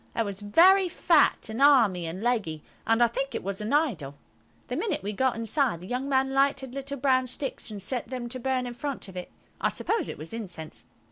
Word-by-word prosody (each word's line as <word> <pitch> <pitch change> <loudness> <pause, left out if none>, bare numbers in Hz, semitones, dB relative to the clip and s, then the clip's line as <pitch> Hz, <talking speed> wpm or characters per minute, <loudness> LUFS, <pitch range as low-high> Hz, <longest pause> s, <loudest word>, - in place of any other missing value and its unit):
It 230 - +1
was 200 0 -5
very 360 - +5
fat 330 -7 +3
and 225 +4 -4
army 225 - +5
and 180 +6 -6
leggy, 205 -11 -1 0.2
and 225 +1 +4
I - - +6
think 270 +4 -3
it - - -3
was 195 +1 -4
an 210 - -3
idol. 215 - 0 0.5
The - - -3
minute 435 - -2
we 205 +2 -3
got 260 +4 +1
inside 230 - 0
the 180 - -10
young 250 +6 -3
man 265 0 +2
lighted 275 -2 +1
little 275 +1 -5
brown 260 -1 +2
sticks, 260 0 -5
and 210 -2 -6
set 240 +6 -2
them 250 -2 -4
to 255 +1 -3
burn 255 0 -1
in 245 - -5
front 275 0 -5
of 185 - -12
it. 180 - -6 0.3
I - - +3
suppose 450 - -1
it - - -6
was 155 +7 -7
incense. 185 -8 -6
245 Hz, 220 wpm, -27 LUFS, 205-275 Hz, 0.5 s, I